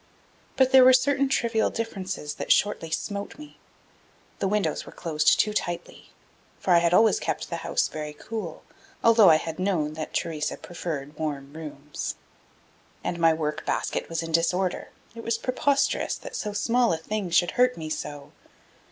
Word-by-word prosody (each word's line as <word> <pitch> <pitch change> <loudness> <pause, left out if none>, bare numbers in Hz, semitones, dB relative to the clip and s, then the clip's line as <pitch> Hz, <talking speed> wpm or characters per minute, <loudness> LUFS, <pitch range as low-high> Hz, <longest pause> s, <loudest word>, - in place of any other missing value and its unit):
But 260 -1 +3
there 265 -1 +8
were 255 0 +8
certain 275 +1 +3
trivial 230 -4 +1
differences 190 -9 -4
that - - -1
shortly 190 -5 +2
smote 200 +5 -4
me. 300 -1 -13 0.8
The 195 - 0
windows 210 +1 0
were - - -12
closed 155 -3 +2
too 210 - +2
tightly; 175 -4 -4 0.5
for 185 - +1
I 170 - +7
had 170 0 +2
always 220 - +5
kept - - -3
the - - -2
house - - 0
very 150 -1 -6
cool, 195 -1 -6 0.4
although 225 -3 +7
I 160 - +7
had 160 +1 -3
known 175 -6 0
that 155 0 -5
Theresa 155 -2 -2
preferred 155 -4 -6
warm 145 -3 -4
rooms. 150 -2 -6 0.9
And 170 - -3
my 165 -1 +5
work 150 -1 -3
basket - - -2
was 165 0 -2
in 165 - -6
disorder; 180 +3 0 0.2
it 230 - -8
was 230 0 0
preposterous 275 +3 +1
that - - -9
so 210 - -3
small 230 +4 +2
a - - 0
thing 205 +3 -4
should 175 0 +3
hurt 250 0 +2
me 160 -1 -5
so. 145 -1 -6
180 Hz, 170 wpm, -26 LUFS, 160-230 Hz, 0.9 s, there